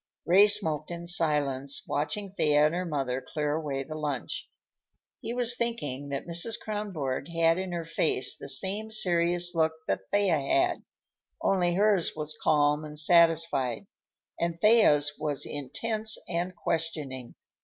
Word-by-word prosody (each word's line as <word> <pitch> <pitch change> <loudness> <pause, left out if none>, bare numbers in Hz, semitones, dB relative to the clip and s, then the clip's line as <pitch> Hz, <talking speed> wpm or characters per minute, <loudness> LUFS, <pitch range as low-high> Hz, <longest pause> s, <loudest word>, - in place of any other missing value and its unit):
Ray 195 +4 +6
smoked 160 -8 +2
in 170 0 -6
silence, 145 -5 +1
watching 185 +7 -3
Thea 150 -5 +3
and 155 - +1
her 180 +1 -2
mother 135 -5 -2
clear 150 +3 -2
away 145 -3 -2
the 155 - -8
lunch. 150 -4 -4 0.7
He - - -5
was 240 0 +2
thinking 145 - -3
that 140 -1 -4
Mrs. 175 +6 -2
Kronborg 180 -11 -4
had 165 0 +2
in 190 -1 -4
her 170 -1 -4
face 160 -5 0
the - - -9
same 200 +10 -2
serious 175 -4 0
look 160 -1 +2
that 95 0 -2
Thea 195 -6 +2
had; 345 - +1 0.6
only 175 -3 +1
hers 200 -3 +3
was 155 0 -4
calm 150 0 +2
and 150 0 -8
satisfied, 165 - +3 0.5
and 170 0 -2
Thea's 170 -9 +5
was 150 -2 -1
intense 215 - -1
and 175 +1 -3
questioning. 150 -7 -4
165 Hz, 145 wpm, -28 LUFS, 145-185 Hz, 0.7 s, Ray